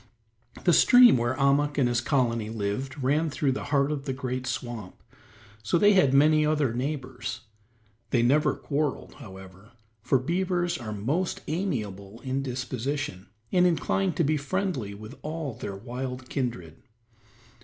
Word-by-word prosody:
The 175 Hz, -, +4 dB
stream 245 Hz, +6 st, +7 dB
where 120 Hz, +1 st, 0 dB
Ahmuk 145 Hz, +2 st, +2 dB
and 135 Hz, -4 st, +3 dB
his 120 Hz, 0 st, +1 dB
colony 120 Hz, -5 st, 0 dB
lived 115 Hz, +6 st, -3 dB
ran 150 Hz, +5 st, +2 dB
through 145 Hz, -1 st, 0 dB
the 130 Hz, -, -4 dB
heart 145 Hz, 0 st, +1 dB
of 140 Hz, -2 st, -4 dB
the 135 Hz, -, -2 dB
great 130 Hz, -1 st, -4 dB
swamp, 120 Hz, -6 st, -5 dB, 0.7 s
so 110 Hz, +10 st, +1 dB
they 205 Hz, +4 st, +5 dB
had 185 Hz, -9 st, +4 dB
many 150 Hz, +3 st, +5 dB
other 150 Hz, -5 st, +1 dB
neighbors; 130 Hz, -2 st, -4 dB, 0.7 s
they 120 Hz, -1 st, +2 dB
never 140 Hz, +5 st, +3 dB
quarreled, 145 Hz, -1 st, -2 dB
however, 95 Hz, +2 st, -12 dB, 0.3 s
for 125 Hz, +4 st, +2 dB
beavers 175 Hz, +5 st, -1 dB
are 110 Hz, -3 st, -6 dB
most 140 Hz, -, -2 dB
amiable 115 Hz, -, -3 dB
in 135 Hz, 0 st, -2 dB
disposition, 130 Hz, -4 st, -4 dB, 0.2 s
and 180 Hz, -1 st, +4 dB
inclined 180 Hz, +1 st, 0 dB
to 170 Hz, -, +2 dB
be 155 Hz, +1 st, +1 dB
friendly 140 Hz, -, -2 dB
with 110 Hz, +5 st, -10 dB
all 155 Hz, -3 st, -4 dB
their 105 Hz, -4 st, -6 dB
wild 125 Hz, +4 st, -6 dB
kindred. 115 Hz, -, -4 dB
130 Hz, 145 wpm, -27 LUFS, 120-150 Hz, 0.7 s, stream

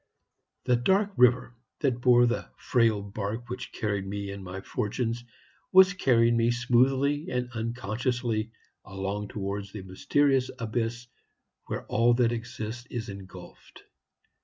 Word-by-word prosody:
"The 125 Hz, -1 st, +3 dB
dark 195 Hz, -, +2 dB
river 125 Hz, 0 st, +4 dB, 0.3 s
that 125 Hz, -4 st, 0 dB
bore 120 Hz, -1 st, +6 dB
the 120 Hz, 0 st, -1 dB
frail 115 Hz, -5 st, +2 dB
bark 105 Hz, +4 st, -5 dB
which 125 Hz, 0 st, -6 dB
carried 100 Hz, -4 st, -2 dB
me 100 Hz, 0 st, -4 dB
and 100 Hz, 0 st, -7 dB
my 95 Hz, +1 st, -6 dB
fortunes 115 Hz, +4 st, -2 dB, 0.5 s
was 190 Hz, +1 st, +7 dB
carrying 120 Hz, -9 st, +3 dB
me 115 Hz, 0 st, +3 dB
smoothly 130 Hz, +6 st, +2 dB
and 125 Hz, 0 st, -2 dB
unconsciously 115 Hz, 0 st, -2 dB, 0.3 s
along 95 Hz, +2 st, -4 dB
towards 100 Hz, 0 st, -4 dB
the 105 Hz, -2 st, -7 dB
mysterious 130 Hz, +8 st, +1 dB
abyss 115 Hz, 0 st, -2 dB, 0.6 s
where -, -, -4 dB
all 120 Hz, +1 st, +3 dB
that 120 Hz, -1 st, +3 dB
exists 120 Hz, 0 st, -5 dB
is 120 Hz, -2 st, -5 dB
engulfed. 100 Hz, -1 st, -12 dB
120 Hz, 130 wpm, -28 LUFS, 105-125 Hz, 0.6 s, was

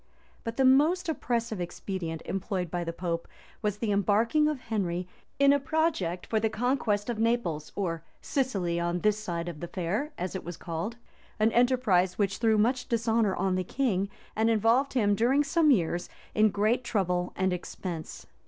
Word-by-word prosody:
} -, -, -32 dB
But 230 Hz, 0 st, -5 dB
the 265 Hz, -, +4 dB
most 310 Hz, +8 st, +4 dB
oppressive 235 Hz, -, -1 dB
expedient 175 Hz, -2 st, -4 dB
employed 190 Hz, -3 st, -3 dB
by 175 Hz, -1 st, -1 dB
the 165 Hz, -, -3 dB
pope, 170 Hz, -1 st, -3 dB, 0.3 s
was 210 Hz, -2 st, -1 dB
the 215 Hz, -1 st, -1 dB
embarking 220 Hz, -, +3 dB
of 300 Hz, -3 st, -1 dB
Henry 185 Hz, -6 st, -2 dB, 0.3 s
in 280 Hz, 0 st, +6 dB
a 285 Hz, -, +3 dB
project 275 Hz, -, 0 dB
for 220 Hz, -, 0 dB
the 220 Hz, 0 st, +1 dB
conquest 220 Hz, -2 st, 0 dB
of 235 Hz, -3 st, -2 dB
Naples, 225 Hz, -10 st, 0 dB
or 165 Hz, -5 st, -2 dB, 0.2 s
Sicily 195 Hz, -, -1 dB
on 175 Hz, +1 st, -1 dB
this 210 Hz, 0 st, +2 dB
side 170 Hz, -5 st, -3 dB, 0.2 s
the 175 Hz, -, -4 dB
Fare, 195 Hz, -, -2 dB
as 180 Hz, -, -3 dB
it 190 Hz, -, -4 dB
was 175 Hz, 0 st, -7 dB
called; 170 Hz, +8 st, -4 dB, 0.4 s
an 220 Hz, +1 st, +4 dB
enterprise 235 Hz, -8 st, +3 dB
which 195 Hz, -2 st, 0 dB
threw 225 Hz, -2 st, +3 dB
much 245 Hz, +4 st, +1 dB
dishonor 225 Hz, -3 st, +2 dB
on 190 Hz, +1 st, 0 dB
the 185 Hz, 0 st, 0 dB
king, 200 Hz, -3 st, 0 dB, 0.3 s
and 220 Hz, +1 st, +2 dB
involved 230 Hz, +5 st, +3 dB
him, 210 Hz, -6 st, +3 dB
during 250 Hz, +7 st, +3 dB
some 310 Hz, +2 st, +3 dB
years, 175 Hz, -, +1 dB, 0.2 s
in 215 Hz, 0 st, +4 dB
great 215 Hz, +5 st, +1 dB
trouble 180 Hz, -6 st, 0 dB
and 190 Hz, -1 st, +1 dB
expense. 175 Hz, -2 st, -6 dB
210 Hz, 175 wpm, -28 LUFS, 180-240 Hz, 0.4 s, in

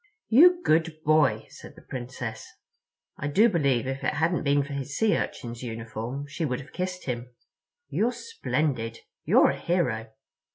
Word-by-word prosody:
"You 350 Hz, +9 st, +7 dB
good 160 Hz, 0 st, +2 dB
boy," 155 Hz, -3 st, +3 dB
said -, -, -12 dB
the -, -, -15 dB
Princess. 120 Hz, -3 st, -6 dB, 0.7 s
I 145 Hz, -, -3 dB
do 200 Hz, +11 st, +5 dB
believe 140 Hz, -, +1 dB
if 135 Hz, +1 st, -4 dB
it -, -, 0 dB
hadn't 170 Hz, +2 st, +1 dB
been 140 Hz, 0 st, +2 dB
for 145 Hz, +1 st, -7 dB
his 140 Hz, +1 st, -4 dB
Sea 220 Hz, -1 st, +3 dB
Urchin's 120 Hz, -1 st, -4 dB
uniform 115 Hz, +3 st, -5 dB
she 155 Hz, +3 st, -4 dB
would 125 Hz, -5 st, -1 dB
have 140 Hz, -, -12 dB
kissed 180 Hz, 0 st, -4 dB
him. 125 Hz, -1 st, -4 dB, 0.6 s
"You're 235 Hz, +3 st, +1 dB
splendid. 150 Hz, -, -2 dB, 0.2 s
You're -, -, +5 dB
a -, -, -6 dB
hero. 125 Hz, -11 st, 0 dB
145 Hz, 160 wpm, -27 LUFS, 125-170 Hz, 0.7 s, You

